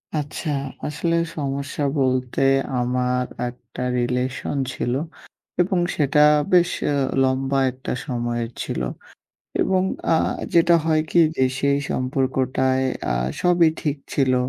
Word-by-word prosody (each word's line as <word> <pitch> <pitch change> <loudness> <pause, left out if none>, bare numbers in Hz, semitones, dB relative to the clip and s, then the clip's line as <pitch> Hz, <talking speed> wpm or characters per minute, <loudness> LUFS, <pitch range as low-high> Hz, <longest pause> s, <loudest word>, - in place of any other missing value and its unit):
আচ্ছা, 150 +1 -3 0.4
আসলে 165 +3 -1 0.2
সমস্যা 140 0 -3 0.2
বলতে, 130 -1 0 0.4
আমার 125 0 0 0.2
একটা 120 0 -10 0.2
রিলেশন 125 +3 -1 0.2
ছিল, 120 - -2 0.7
এবং 180 0 +1 0.2
সেটা 150 0 +3 0.3
বেশ 175 -1 +5 0.2
আ - - +1 0.3
লম্বা 135 +1 +1
একটা 130 +1 -7 0.2
সময়ের 120 -2 -2
ছিল। - - -3 0.8
এবং 185 -1 +2 0.3
আ - - +5 0.4
যেটা 170 0 +5
হয় 155 -1 +3
কি 175 - +4 0.2
যে 130 - +3 0.2
সেই 140 0 +2
সম্পর্কটায় 130 0 0 0.3
আ - - 0 0.3
সবই 175 -2 +4
ঠিক 145 -1 -1 0.2
ছিল। 130 -2 +2
135 Hz, 115 wpm, -22 LUFS, 125-155 Hz, 0.8 s, বেশ